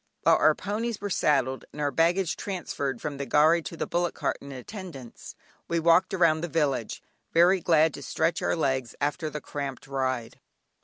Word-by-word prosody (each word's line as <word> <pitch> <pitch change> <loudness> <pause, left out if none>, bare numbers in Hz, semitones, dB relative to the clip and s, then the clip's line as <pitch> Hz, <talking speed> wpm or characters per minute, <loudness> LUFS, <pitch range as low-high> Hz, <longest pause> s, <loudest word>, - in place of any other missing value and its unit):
While - - +5
our - - +4
ponies 220 +2 -3
were 205 0 -4
saddled, 135 -5 +1
and 150 - -11
our 145 -1 0
baggage 170 +4 +2
transferred 145 -9 -4
from 145 +1 -5
the 140 - -4
gharry 155 +3 +4
to 165 - -8
the - - -2
bullock 175 0 -1
cart - - -1
in 140 - -9
attendance, 135 - -9 0.3
we 170 - 0
walked 170 +3 +4
round 165 -3 +3
the - - -1
village, 145 -8 -1 0.3
very 175 +3 +5
glad 160 -2 +3
to 140 - -8
stretch 165 +6 -1
our - - +1
legs 130 -6 -1
after 145 +2 -1
the 150 0 -6
cramped 140 -2 -5
ride. 130 -4 -3
155 Hz, 185 wpm, -27 LUFS, 140-175 Hz, 0.3 s, While